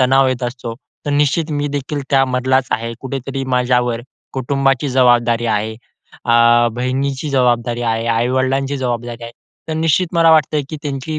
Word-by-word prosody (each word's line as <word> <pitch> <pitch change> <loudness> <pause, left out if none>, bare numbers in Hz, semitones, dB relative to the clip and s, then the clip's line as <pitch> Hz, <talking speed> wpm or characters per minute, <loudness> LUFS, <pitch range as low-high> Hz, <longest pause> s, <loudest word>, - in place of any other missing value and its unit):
तणाव 130 +1 +4
येत 130 -1 -2
असतो. 120 -1 -5 0.3
तर - - 0
निश्चित 150 +3 +1
मी 145 0 -1
देखील 145 +1 -3
त्यामधलाच 130 -1 +2
आहे, 115 0 -2
कुठेतरी 135 0 -4
माझ्यावर 125 -2 +1 0.3
कुटुंबाची 135 +1 0
जबाबदारी 120 -2 +3
आहे, 110 0 -1 0.5
अ, 120 0 +5
बहिणीची 135 +4 -2
जबाबदारी 120 -2 +1
आहे, 115 0 -1
आई-वडिलांची 130 +4 0
जबाबदारी 120 -2 -3
आहे. 115 - -9 0.4
तर - - -2
निश्चित 165 +2 +1
मला 165 -1 +5
वाटतंय, 155 -1 +3
की 155 - -4
त्यांची 145 +2 -4
130 Hz, 145 wpm, -17 LUFS, 120-140 Hz, 0.5 s, अ